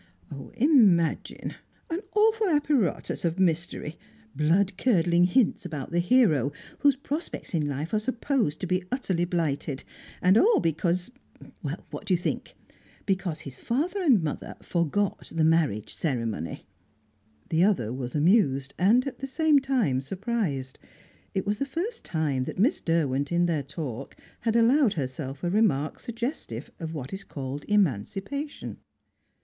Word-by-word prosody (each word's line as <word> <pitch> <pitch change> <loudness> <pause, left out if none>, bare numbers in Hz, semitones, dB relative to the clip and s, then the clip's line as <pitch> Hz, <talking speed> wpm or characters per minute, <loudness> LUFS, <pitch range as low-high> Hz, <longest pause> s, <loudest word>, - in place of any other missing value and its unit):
"Imagine! 215 - +3 0.4
An 330 - 0 0.2
awful 435 -1 +3
apparatus 290 - +1
of 170 0 0
mystery; 170 -3 -1 0.4
blood 180 +7 +2
curdling 175 -6 +3
hints 220 +3 +2
about 155 -6 -5
the 170 - +1
hero, 175 - +3 0.3
whose 285 -2 +4
prospects 290 - -5
in 155 -3 +1
life 145 +7 -4
are 215 - +3
supposed 235 - -1
to - - -1
be 185 0 0
utterly 190 -9 0
blighted. 155 -5 -2 0.4
And 185 +4 +5
all 455 +3 +5
because 175 +4 0 0.5
what - - -6
do 185 - +4
you - - +1
think? 175 - -3 0.5
Because 190 -5 -1
his 135 -2 -10
father 340 - -1
and 255 - +4
mother 150 - -4
forgot 180 +4 -1
the 160 - +2
marriage 155 -10 +2
ceremony." 115 - -3 0.8
The 165 +2 +3
other 145 - +2
was 125 0 -5
amused, 145 - +3
and 225 +8 +4
at 275 - -5
the 270 - -4
same 305 +1 +4
time 245 - +1
surprised. 180 - -3 0.6
It 190 - 0
was 205 0 -1
the 275 - 0
first 380 - -4
time 145 -6 -1
that - - -6
Miss 225 - +2
Derwent, 145 -4 0
in 175 0 +3
their 165 -4 0
talk, 140 -3 -6 0.2
had 225 -1 0
allowed 235 +1 +4
herself 135 0 -4
a 175 - 0
remark 160 -9 +1
suggestive 235 - -5
of 160 -1 -5
what 135 0 -6
is 195 +1 -5
called 140 -2 -6
"emancipation." 200 - -1
175 Hz, 145 wpm, -27 LUFS, 150-235 Hz, 0.8 s, And